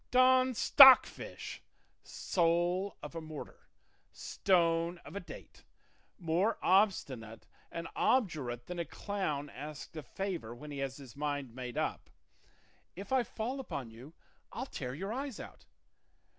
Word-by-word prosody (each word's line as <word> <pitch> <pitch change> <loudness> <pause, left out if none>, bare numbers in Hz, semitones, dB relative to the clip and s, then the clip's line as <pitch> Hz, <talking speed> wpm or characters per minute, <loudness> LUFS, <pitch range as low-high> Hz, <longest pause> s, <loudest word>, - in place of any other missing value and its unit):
Don 255 0 +5
Stockfish, 265 +3 +6 0.4
soul 175 +3 0
of - - -7
a 165 - -5
mortar, 155 -2 -10 0.4
stone 170 -2 +1
of - - -10
a - - -2
date, 180 - -12 0.5
more 180 +6 +1
obstinate 140 - +1 0.3
and 165 0 -5
obdurate 145 - 0
than 180 -1 -6
a 170 - -1
clown 165 -10 -3
asked 150 +3 -8
a 155 - -5
favour 165 - -5
when 150 +5 -10
he 140 - -6
has 135 -1 -3
his 135 -5 -12
mind 145 -4 -3
made 125 -1 -6
up, - - -2 0.9
if 195 +5 -9
I 260 - +4
fall 240 +3 -4
upon 135 - -6
you 130 +8 -13 0.4
I'll - - -4
tear 125 0 -6
your 195 +7 -4
eyes 270 -2 -4
out! - - -11
170 Hz, 135 wpm, -32 LUFS, 140-200 Hz, 0.9 s, Stockfish